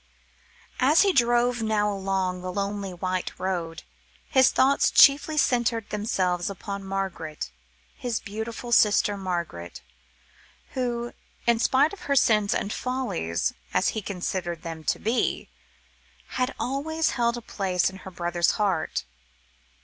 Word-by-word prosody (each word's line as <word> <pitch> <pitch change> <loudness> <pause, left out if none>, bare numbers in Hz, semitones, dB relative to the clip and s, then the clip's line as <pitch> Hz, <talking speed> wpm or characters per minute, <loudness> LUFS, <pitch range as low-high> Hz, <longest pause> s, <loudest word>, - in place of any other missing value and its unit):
As 290 +8 +5
he 395 -2 +3
drove 240 -1 +3
now 210 -2 +1
along 190 -2 -1
the 185 0 -4
lonely 200 0 -3
white 185 +1 -2
road, 170 -3 -3 0.4
his 260 -2 +5
thoughts 270 +2 +3
chiefly 295 +2 +6
centred 240 -5 +1
themselves 185 -4 0
upon 200 +1 -6
Margaret, 190 - -4 0.4
his 240 -3 -2
beautiful 225 +3 -6
sister 210 -2 +4
Margaret, 170 - -4 0.9
who, 240 -2 -2 0.3
in 235 -1 +3
spite 275 +7 +3
of 405 - -9
her 280 - +3
sins 215 -5 +3
and 200 - -2
follies, 250 - -2 0.2
as - - +3
he 220 - -3
considered 180 -3 -4
them 165 -1 -6
to - - +1
be, 230 +4 -1 0.8
had 255 +1 -1
always 310 +5 -1
held 235 -1 0
a - - -6
place 190 -5 0
in 190 - -5
her 190 - -10
brother's 175 -1 0
heart. 180 - 0
205 Hz, 130 wpm, -26 LUFS, 180-240 Hz, 0.9 s, chiefly